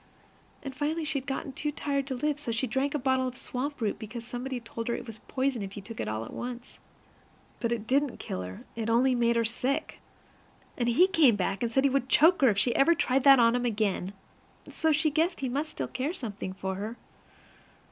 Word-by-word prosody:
And 270 -2 -5
finally 310 +3 -1
she 300 -2 0
had 265 - -15
just 270 - -2
got 270 - -8
too 295 - -2
tired 280 -2 -2
to 265 - -2
live, 295 +3 -1
so 270 -6 -2
she 230 +3 0
drank 270 +4 -1
a - - +3
bottle 260 -1 +1
of 250 0 -6
swamp 280 +3 -4
root 215 -4 -1
because 230 +2 -7
somebody 250 +2 -4
had 240 -1 -6
told 230 0 -5
her 235 - 0
it - - -6
was 225 -2 -9
poison 260 -3 -1
if 195 0 -6
you 200 - -7
took 225 +2 -9
it - - -2
all 110 +1 -3
at - - -10
once. 245 0 -7 0.8
But 235 - -1
it 230 -2 -2
didn't 275 +2 +1
kill 90 - -5
her; 90 0 -8
it 225 0 -3
only 250 +3 +4
made 235 -1 +2
her 230 0 +2
sick. 265 +6 -2 0.8
And 240 -1 0
he 290 +10 +6
came 315 - +5
back, 195 0 -1
and 235 -1 0
said 265 +3 +2
he 280 - +4
would 265 -1 0
choke 330 +5 +5
her 265 - +7
if 205 - 0
she 235 +4 +2
ever 335 +5 +5
tried 260 -3 +1
that 275 -1 +9
on 230 0 +5
him 245 0 0
again; 205 -5 -1 0.5
so 320 - +1
she 310 +1 +2
guessed 330 +3 0
he 265 - -1
must 290 +5 -2
still - - -4
care 275 +6 -3
something 210 - -5
for 190 0 -4
her. 215 +4 -5
250 Hz, 240 wpm, -28 LUFS, 230-280 Hz, 0.8 s, that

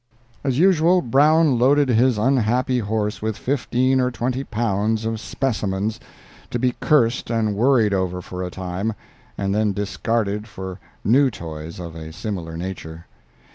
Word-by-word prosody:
As 135 -3 0
usual, 180 +1 +4
Brown 145 +2 +4
loaded 140 +2 +4
his 120 0 +3
unhappy 125 +1 +2
horse 105 -1 -2
with 110 -1 -2
fifteen 130 -1 +1
or 125 - +2
twenty 125 +2 -2
pounds 110 -2 -1
of 110 0 -2
"specimens," 110 -4 -2 0.5
to - - -2
be 125 +1 +1
cursed 125 -5 +2
and 110 -3 +1
worried 115 -1 +3
over 95 -2 -1
for 90 +1 -7
a 90 - -3
time, 95 +4 -3 0.4
and 100 0 -1
then 105 -1 +1
discarded 105 +1 -1
for 95 -2 -7 0.2
new 130 +6 +4
toys 80 -5 -8
of 85 -2 -7
a 80 -1 -8
similar 85 -3 -5
nature. 85 -2 -7
110 Hz, 145 wpm, -22 LUFS, 95-125 Hz, 0.5 s, usual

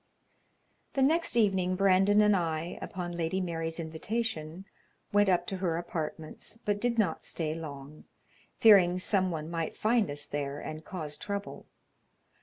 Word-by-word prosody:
The 270 - +2
next 320 -1 +2
evening 190 -4 +2
Brandon 195 +2 +4
and 210 -1 +5
I, 165 -1 -2
upon 180 -2 -5
Lady 170 +2 -1
Mary's 165 -2 -2
invitation, 165 +1 -3 0.5
went 205 -1 +4
up 180 -2 +2
to 195 - -4
her 175 -3 0
apartments, 160 +2 -5
but 205 0 0
did 240 -1 0
not 195 -8 +1
stay 155 -2 -2
long, 150 -2 -8 0.5
fearing 190 -5 +6
some 185 0 +1
one 160 -3 -4
might 165 -1 -3
find 220 -3 +2
us 145 +1 -4
there 145 -1 -3
and 155 +1 -7
cause 155 -6 -5
trouble. 200 -1 -5
180 Hz, 145 wpm, -30 LUFS, 160-200 Hz, 0.5 s, fearing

